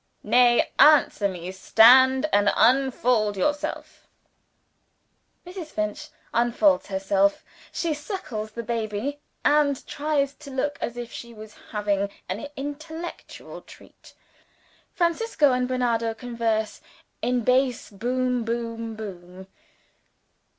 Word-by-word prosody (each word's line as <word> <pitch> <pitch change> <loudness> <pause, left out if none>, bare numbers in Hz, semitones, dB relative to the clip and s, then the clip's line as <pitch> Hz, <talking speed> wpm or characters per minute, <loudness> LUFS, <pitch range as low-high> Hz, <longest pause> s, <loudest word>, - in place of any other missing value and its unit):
"Nay, 245 -1 +4
answer 295 -8 +5
me: 180 -1 -6
stand, 260 +8 +5
and 205 0 +4
unfold 245 -4 +2
yourself." 290 +9 -3 1.4
(Mrs. 360 -2 -8
Finch 210 -7 -4 0.3
unfolds 240 +5 +2
herself 195 +1 0 0.3
she 335 -2 -1
suckles 290 - -6
the 235 - -5
baby, 230 +4 -3 0.3
and 290 -2 +2
tries 285 -2 -1
to 300 -1 -13
look 275 +2 -2
as 240 - -4
if 240 -1 -6
she 235 -1 -9
was 215 0 -11 0.2
having 205 -2 -1 0.2
an 205 +10 -4
intellectual 315 +5 -8
treat.) - - -17 0.8
"Francisco 340 - +1
and 250 0 0
Bernardo 235 -3 0
converse 225 -2 -2 0.4
in 245 +1 0
bass 255 0 +1
Boom 250 +3 -1
boom 230 -1 -4
boom. 190 -3 -9
240 Hz, 105 wpm, -24 LUFS, 215-280 Hz, 1.4 s, answer